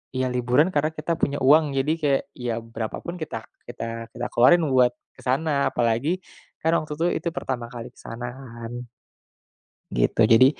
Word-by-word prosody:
iya 130 0 +1
liburan 125 +7 +3
karena 155 0 +1
kita 155 +2 -2
punya 145 0 +1
uang, 145 0 +5
jadi 140 +4 +2
kayak, 140 -2 +2
ya 120 -2 -3
berapapun 115 +9 -5
kita 145 -8 -5 0.2
kita 115 -1 -5
kita 120 0 -4
keluarin 165 +8 +6
buat 125 -1 +5 0.2
ke - - -15
sana, 150 +5 +1 0.2
apalagi 120 +5 +1 0.5
kan 160 - +3
waktu 150 -1 -5
itu 165 +3 0 0.2
itu 170 - +1
pertama 125 -8 -3
kali 120 +1 -7
ke - - -23
sana 120 +1 -6
kan. 120 -1 -8 1.0
Gitu, - - 0
jadi, 115 +3 +7
125 Hz, 165 wpm, -24 LUFS, 120-150 Hz, 1.0 s, jadi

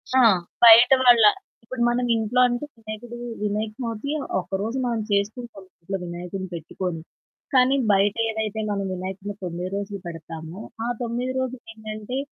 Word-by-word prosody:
ఆ! - - +6 0.4
బయట 235 +2 +9
వాళ్ళ 240 -3 +7 0.4
ఇప్పుడు 240 +1 -6
మనమింట్లో 240 0 +1
అంటే 245 +3 -2
వినాయకుడు 225 +2 -8 0.3
వినాయకచవితి 215 +4 -3 0.3
ఒకరోజు 200 +7 -3
మనం 235 -2 -1
చేసుకుంటాం 205 +1 -2 0.2
ఇంట్లో 195 +3 -3
వినాయకుడిని 180 +2 -6
పెట్టుకొని 170 +1 -4 0.5
కానీ 255 +1 +5 0.2
బయటేదైతే 220 +2 0
మనం 200 -1 -1
వినాయకుడిని 190 +2 -6
9 175 +1 -4
రోజులు 200 0 -5
పెడతామో 165 +2 -8 0.3
ఆ - - -1
9 245 +2 -2
రోజులేంటంటే 225 -2 -5
215 Hz, 115 wpm, -24 LUFS, 195-240 Hz, 0.5 s, బయట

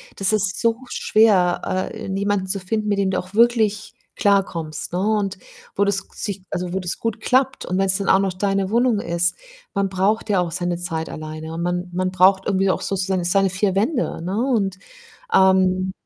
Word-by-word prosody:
das 195 +1 +1
ist 195 -3 0
so 230 0 +2
schwer, 185 -3 +2
äh, 220 -2 -7
jemanden 195 0 -1
zu 195 +1 -1
finden, 210 +3 -2
mit 205 -1 +1
dem 190 -1 +1
du 185 - 0
auch 185 +2 -9
wirklich 225 -3 +2 0.2
klarkommst, 170 -6 0
ne? 180 - 0
Und 205 -2 0 0.4
wo 200 - +2
das 200 -1 0
sich 200 -2 -4
also, 180 0 -3
wo 190 - -1
das 180 -2 -4
gut 225 -1 -2
klappt 260 +3 +1
und 185 - -2
wenn's 195 0 +2
dann 195 - -4
auch 190 - +5
noch 195 -1 0
deine 195 0 -1
Wohnung 235 -1 +2
ist. 170 +1 0 0.4
Man 200 -1 0
braucht 200 +4 0
ja 195 - +3
auch 175 -2 -1
seine 175 0 -2
Zeit 165 -2 -4
alleine, 155 +1 -7
und 165 - -4
man 175 +1 -2
man 185 +1 -1
braucht 190 +1 +4
irgendwie 195 -1 +2
auch - - -1
sozusagen 190 -2 -1
seine 195 +2 +3
4 185 +1 0
Wände, 235 - 0
ne? 190 +4 -3 0.2
Und, 195 -5 0 0.6
ähm 190 0 +3
190 Hz, 195 wpm, -21 LUFS, 180-205 Hz, 0.6 s, auch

